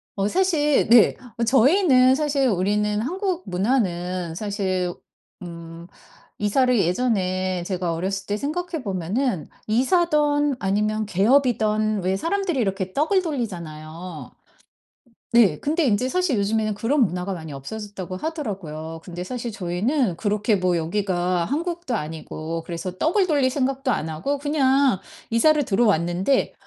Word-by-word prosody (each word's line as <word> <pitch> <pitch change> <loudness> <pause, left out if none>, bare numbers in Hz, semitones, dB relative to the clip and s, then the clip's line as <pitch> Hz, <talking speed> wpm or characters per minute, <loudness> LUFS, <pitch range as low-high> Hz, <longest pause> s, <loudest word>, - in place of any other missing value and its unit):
어 195 0 0
사실 300 - +2
네. 235 -2 +6 0.2
어 235 - 0
저희는 260 - +5
사실 285 -3 +1
우리는 210 +2 +1
한국 370 - -2
문화는 180 -4 -1
사실 190 -3 -2 0.5
음 170 -1 -9 0.5
이사를 250 +4 +2
예전에 185 -2 0
제가 180 -2 -2
어렸을 195 +3 -3
때 205 +1 -1
생각해 320 - -3
보면은 195 - -2 0.2
이사든 290 - +2
아니면 210 +2 0
개업이든 215 -1 +2
왜 190 +1 +1
사람들이 350 - -1
이렇게 195 -3 -1
떡을 365 +6 +2
돌리잖아요. 170 - -6 1.0
네, 205 -10 +5
근데 320 +4 0
인제 245 +2 +2
사실 360 - +1
요즘에는 215 +1 0
그런 265 +7 +1
문화가 180 +1 -3
많이 160 -4 -7
없어졌다고 190 +5 -7
하더라고요. 180 - -5
근데 175 -1 -6
사실 245 0 -4
저희는 205 - -1
그렇게 210 +1 +1
뭐 180 -2 +1
여기가 180 0 0
한국도 335 -3 -2
아니고 160 0 -5
그래서 180 +2 -5
떡을 365 +4 +2
돌릴 285 -5 +2
생각도 270 -1 0
안 160 -7 -1
하고 185 - -2
그냥 275 - +2 0.3
이사를 300 +6 +4
들어왔는데 195 - +1
210 Hz, 305 characters per minute, -23 LUFS, 180-275 Hz, 1.0 s, 네